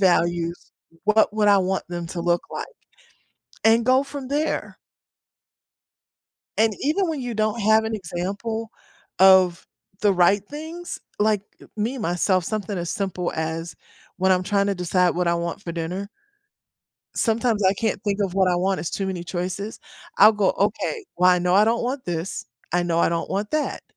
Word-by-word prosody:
values, 175 -2 +1 0.3
what 215 0 +3
would 210 -1 +3
I 200 -1 +6
want 190 0 -1
them 175 -1 -4
to 170 - -5
look 175 0 +1
like?" - - -4 1.0
And 225 +1 +4
go 260 +2 +4
from 275 -1 -7
there. 295 +3 -2 1.8
And 220 -1 +3
even 330 +6 +1
when 310 -4 -2
you 245 -2 -4
don't 215 +2 0
have 220 +1 +4
an 220 0 -2
example 205 +5 -4 0.5
of 185 -2 +5 0.3
the 205 -2 +4
right 185 +2 +4
things, 320 +4 -7 0.2
like, 210 -1 +2 0.2
e - - -14
me, 230 +5 -2
myself, 180 -1 +1
something 205 -1 -3
as 170 -1 -3
simple 190 -5 -2
as 160 +1 -3 0.4
when 190 0 +3
I'm 180 0 +2
trying 200 +1 +1
to 200 - 0
decide 180 0 +2
what 180 0 0
I 170 - +3
want 170 +2 -3
for 170 - -5
dinner. 175 +4 -4 1.1
Sometimes 225 -2 +1
I 190 - +5
can't 220 -1 -2
think 205 -2 -1
of 190 -2 -2
what 190 -1 +3
I 180 - +2
want, 190 +2 0
it's 170 - -3
too 195 - -2
many 185 -2 -3
choices. 185 +4 -4 0.4
I'll 210 +2 +8
go, 205 -3 +2
"Okay, 445 -3 -1
well, 180 +1 +5
I 180 - +4
know 180 +1 +1
I 205 +2 +6
don't 230 +2 +1
want 255 +2 -3
this, 175 +1 -4 0.3
I 175 - +2
know 170 -1 0
I - - +4
don't 170 0 -2
want 205 +2 -2
that." 305 -1 -1
195 Hz, 180 wpm, -23 LUFS, 175-220 Hz, 1.8 s, I'll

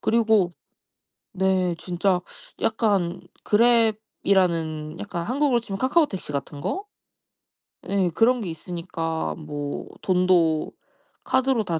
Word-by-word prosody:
그리고 220 -5 +3 0.8
네 185 -2 +1
진짜 180 +1 0 0.4
약간 200 -6 +1 0.2
그랩이라는 195 -8 +2
약간 175 -4 -4
한국으로 265 0 +2
치면 200 -4 -6
카카오택시 260 - +1
같은 140 0 -4
거? 390 - -3 1.0
예. 195 -2 +1
그런 240 +6 +3
게 190 - -4
있으니까 165 -1 -4
뭐 145 -2 -5
돈도 180 -4 +2 0.5
카드로 260 -3 +2
다 170 -4 -2
190 Hz, 225 characters per minute, -24 LUFS, 170-225 Hz, 1.0 s, 그리고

